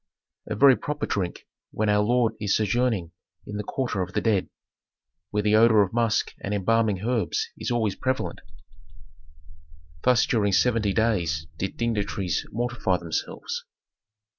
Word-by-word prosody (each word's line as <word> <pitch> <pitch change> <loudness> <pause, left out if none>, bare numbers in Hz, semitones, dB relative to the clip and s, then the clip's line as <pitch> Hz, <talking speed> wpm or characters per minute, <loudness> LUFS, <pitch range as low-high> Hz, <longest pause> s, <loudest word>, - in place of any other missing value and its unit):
"A 110 - -3
very 135 +4 +7
proper 150 +3 -3
drink 90 -4 -3 0.2
when 110 - -1
our 105 0 +3
lord 120 +1 +2
is 100 -2 +1
sojourning 110 -5 0 0.3
in 105 - -6
the 105 - -3
quarter 120 -3 -2
of 90 +1 -4
the - - +1
dead, 105 -5 +1 0.8
where 105 0 -1
the 105 +1 +3
odor 110 -1 +6
of 95 - -5
musk 115 -3 +1
and 100 +1 -1
embalming 105 -1 +1
herbs 115 -8 0
is - - -4
always 115 -4 +1
prevalent." 130 +4 -2 1.6
Thus 125 +3 +4
during 100 -4 +1
seventy 110 0 +2
days 90 -10 0
did 95 - -3
dignitaries 105 -7 -1
mortify 120 -6 0
themselves. 85 -3 -4
105 Hz, 140 wpm, -25 LUFS, 100-115 Hz, 1.6 s, very